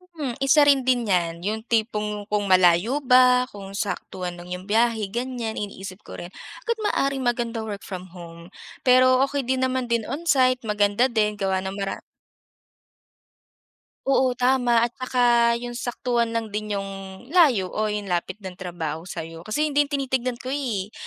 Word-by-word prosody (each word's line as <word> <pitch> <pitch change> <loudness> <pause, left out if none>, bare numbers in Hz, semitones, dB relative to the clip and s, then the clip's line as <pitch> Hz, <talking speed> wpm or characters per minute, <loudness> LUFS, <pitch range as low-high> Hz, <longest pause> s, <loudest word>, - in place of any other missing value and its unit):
Mm, 275 -7 -3
isa 280 +2 +6
rin 275 -2 +5
din 245 -3 +2
yan, 170 -3 0
yung 215 +2 -2
tipong 210 -2 -1
kung 210 -1 +1
malayo 185 +8 +4
ba, 250 0 +6
kung 195 -1 -9
saktuhan 185 -3 -4
lang 175 - -10
yung 180 0 -5
biyahe 225 0 +2
ganyan, 240 -1 -3
iniisip 195 -2 -7
ko - - -8
rin, 175 - -6 0.4
agad 465 -1 -1
maaaring 275 -5 0
maganda 240 -1 -1
work 210 -2 -5
from 185 -2 -8
home, 170 -1 -11 0.4
pero 255 0 +5
okey 280 0 -2
din 260 0 +1
naman 255 -1 -2
din 235 -1 +2
on 300 +5 -4
site 255 -4 +4
maganda 210 +3 +2
din 210 -2 +1
gawa 190 -1 0
ng 190 0 -4
mara 195 0 -3 2.1
Oo, 260 -2 +2
tama 245 -2 +3
at 240 - -6
saka 240 -2 +3
yung 240 0 -6
saktuhan 240 -1 -1
lang 225 -2 -3
din 210 -1 -2
yung 195 +1 -7
layo 255 - +4
o 215 0 0
yung 210 -1 -3
lapit 180 +1 -2
ng 190 -3 -8
trabaho 175 -4 -5
sayo, 165 -1 -7
kasi 215 - -1
yun 300 - -3
din 290 0 +2
tinitignan 260 -3 -1
ko 255 +2 -5
eh. 225 -8 -3
230 Hz, 170 wpm, -24 LUFS, 195-255 Hz, 2.1 s, isa